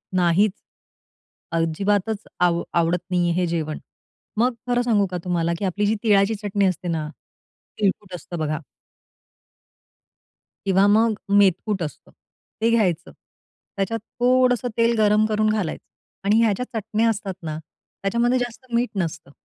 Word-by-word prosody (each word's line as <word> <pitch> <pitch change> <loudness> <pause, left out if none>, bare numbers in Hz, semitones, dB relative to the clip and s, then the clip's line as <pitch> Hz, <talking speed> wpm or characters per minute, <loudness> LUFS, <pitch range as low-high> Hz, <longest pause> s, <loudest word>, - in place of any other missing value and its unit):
नाहीच, 180 +3 +3 1.0
अजिबातच 200 +6 0 0.2
आव 175 -1 +3
आवडत 170 +1 +2
नाही 180 -1 +1
आहे 170 - 0
हे - - +2
जेवण, 155 -2 -2 0.6
मग 245 +3 +3
खरं 245 0 +2
सांगू 215 -5 +2
का 180 - -2
तुम्हाला 170 -2 0
की 200 - -1
आपली 200 +3 0
जी 215 - +2
तीळाची 205 0 +4
चटणी 205 -1 0
असते 185 -1 -1
ना, 155 -2 -2 0.7
तीळकुट 200 -2 -1
असतं 175 +1 -7
बघा 155 0 -1 2.1
किंवा 195 +1 +4
मग 220 +2 +4 0.2
अ, - - 0
मेतकूट 200 0 +3
असतं. 150 - -8 0.5
ते 230 - +3
घ्यायचं, 185 -7 +1
त्याच्यात 215 +3 -7 0.2
थोडंसं 250 -1 +3
तेल 230 0 +3
गरम 210 0 +4
करून 215 0 +2
घालायचं 210 -7 -2 0.4
आणि 220 +3 +4
ह्या 225 - +4
ज्या 250 - -3
चटण्या 220 +1 0
असतात 200 -3 -2
ना, 155 -1 -4 0.5
त्याच्यामध्ये 235 +5 +2
जास्त 245 +1 -5
मीठ 240 +1 +2
नसतं. 165 -7 -3
200 Hz, 140 wpm, -23 LUFS, 175-225 Hz, 2.1 s, तीळाची